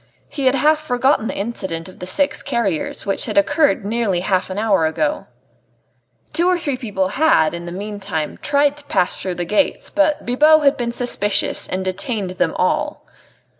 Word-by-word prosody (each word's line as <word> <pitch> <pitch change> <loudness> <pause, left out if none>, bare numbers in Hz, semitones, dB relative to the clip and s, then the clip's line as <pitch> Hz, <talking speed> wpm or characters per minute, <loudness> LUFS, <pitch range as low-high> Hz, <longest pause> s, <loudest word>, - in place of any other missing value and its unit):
He 275 -3 -1
had 260 - +4
half 305 +3 +3
forgotten 260 -4 +1
the - - -4
incident 190 -6 -4
of 185 - -14
the 180 - -6
six 280 +10 +1
carriers, 235 - -2
which 195 - 0
had - - -3
occurred 300 -9 +2
nearly 210 -4 0
half 185 0 0
an 185 - -5
hour 200 -7 +2
ago. 295 - -2 1.1
Two 345 +1 +1
or 365 - +3
three 295 -5 -2
other 255 - -6
people 195 -5 -1
had, 260 - +3
in 170 0 -6
the - - -5
meanwhile, 195 -4 -4
tried 285 0 +2
to 295 - -14
pass 180 - 0
through 185 -2 -3
the 175 - -3
gates, 210 +11 0
but 300 0 +1
Bibot 300 +5 +4
had 280 0 +4
been 240 -3 -2
suspicious 235 -4 0
and 185 +1 -3
had 185 0 -1
detained 200 -3 -3
them 185 - -1
all. - - -1
225 Hz, 190 wpm, -19 LUFS, 185-285 Hz, 1.1 s, had